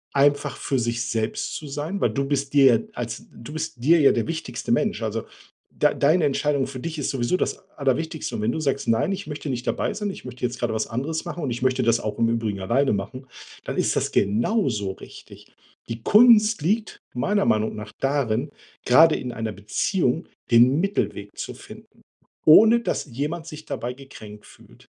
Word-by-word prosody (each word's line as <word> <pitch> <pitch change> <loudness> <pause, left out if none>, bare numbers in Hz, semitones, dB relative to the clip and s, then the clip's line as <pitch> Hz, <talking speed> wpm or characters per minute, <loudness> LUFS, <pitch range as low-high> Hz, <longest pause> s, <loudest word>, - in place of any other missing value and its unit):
einfach 145 0 +2
für 135 - -1
sich 120 -1 -1
selbst 110 -1 -2
zu 155 - -7
sein, 150 +7 -4
weil - - +2
du 140 0 -1
bist 140 -1 -2
dir 140 -2 +6
ja - - +1
als 120 -2 -5
du 115 +6 -11
bist 145 -6 -5
dir 165 +6 +5
ja 140 - +6
der 115 - -1
wichtigste 160 +6 -4
Mensch. 215 - 0
Also, 110 0 -2 0.5
dei - - +2
deine 155 +3 +3
Entscheidung 140 -1 0
für 130 -1 -7
dich 165 -1 -5
ist 140 - -2
sowieso 130 +6 0
das - - -1 0.2
Allerwichtigste 150 +3 -1
und - - -3
wenn 110 +2 +1
du 160 - -3
sagst: 140 -4 -1
„Nein, 115 - +2
ich 195 +1 -5
möchte 150 0 -6
nicht 125 -2 -3
dabei - - -1
sein, 210 -1 -3
ich - - -11
möchte 125 0 -10
jetzt 120 0 -2
gerade 120 -2 -1
was 110 0 -1
anderes 140 +7 -3
machen 175 - -5
und 140 - -1
ich 120 - -4
möchte 130 0 +2
das 115 0 +3
auch 105 -1 -4
im 115 - +3
Übrigen 115 -4 -1
alleine 120 +8 +1
machen“, 105 +7 -5 0.4
dann - - -5
ist - - +1
das - - 0
genauso 110 - +1
richtig. 95 - -13 0.4
Die 115 0 -5
Kunst 215 -2 +6
liegt 210 +8 -1 0.2
meiner 200 +11 +1
Meinung 110 0 +1
nach 105 -1 -8
darin, 135 -1 0 0.3
grade 160 +6 +6
in 125 - -4
einer 110 -1 -3
Beziehung 125 - -1 0.2
den 125 +5 +6
Mittelweg 170 - -2
zu - - -5
finden, - - -14 0.4
ohne 220 +9 +8
dass - - -2
jemand 150 +6 -4
sich 155 -1 -9
dabei 120 +1 -4
gekränkt 110 -6 -12
fühlt. - - -18
135 Hz, 195 wpm, -24 LUFS, 115-160 Hz, 0.5 s, ohne